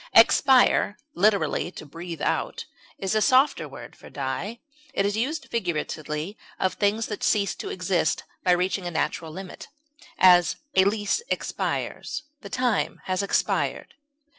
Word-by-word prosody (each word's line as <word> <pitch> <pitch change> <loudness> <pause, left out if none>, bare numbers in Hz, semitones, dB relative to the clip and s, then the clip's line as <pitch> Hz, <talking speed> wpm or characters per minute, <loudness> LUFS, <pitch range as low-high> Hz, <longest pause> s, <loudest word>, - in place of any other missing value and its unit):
Expire 255 -6 +5 0.2
(literally, 200 -2 +2
to - - -9
breathe 165 +2 -7
out) - - -1 0.3
is 195 +1 -2
a 215 - +2
softer 260 +6 +3
word - - -10
for - - -14
die; 145 - -4 0.4
it 200 - +2
is 205 0 0
used 270 +5 -2
figuratively 160 -3 -3 0.2
of 185 -1 +1
things 215 +2 +1
that 210 - -5
cease 200 -3 +2
to - - -6
exist 180 -3 0 0.2
by 180 - +3
reaching 180 +1 0
a - - -1
natural 160 -1 -2
limit; 185 +3 -9 0.5
as, 180 -2 +6 0.2
a 190 - +5
lease 205 - +1
expires; 305 +1 -3 0.2
the - - -9
time 250 -3 0
has 185 0 -1
expired. 200 - 0
195 Hz, 140 wpm, -25 LUFS, 175-220 Hz, 0.5 s, as